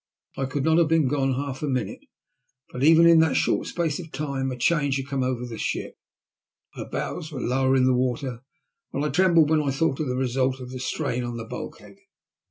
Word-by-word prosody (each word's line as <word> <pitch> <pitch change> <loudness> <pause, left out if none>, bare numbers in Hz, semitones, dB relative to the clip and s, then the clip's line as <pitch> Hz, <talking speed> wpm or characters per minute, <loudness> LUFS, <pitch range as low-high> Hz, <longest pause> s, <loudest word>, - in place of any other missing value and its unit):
I 135 - -2
could 135 +1 -2
not 160 +2 +4
have 170 - +4
been 160 -3 +3
gone 135 -1 0
half 135 0 -4
a 150 - -2
minute, 130 -4 -2 0.7
but 125 - -4
even 165 +2 +7
in 170 -1 +7
that 160 0 +3
short - - +1
space 165 -3 -2
of 165 -3 -9
time 135 -2 -3
a 125 - -5
change 140 +1 +1
had 135 - -4
come 140 -1 -2
over 125 -1 -1
the 115 -2 -7
ship. - - -3 0.8
Her - - -8
bows 165 -2 -4
were 140 - -5
lower 130 +2 +1
in 130 -1 +4
the 130 - +4
water, 125 0 -1 0.5
and 140 +2 -1
I - - 0
trembled 170 -4 +4
when 155 -1 +4
I 145 - -1
thought 135 0 0
of 155 - -1
the 125 - -1
result 130 +1 0
of 125 -1 -8
the 130 - -6
strain 125 -1 -2
on 120 -1 -4
the 115 - -6
bulkhead. - - -9
135 Hz, 220 wpm, -25 LUFS, 130-155 Hz, 0.8 s, even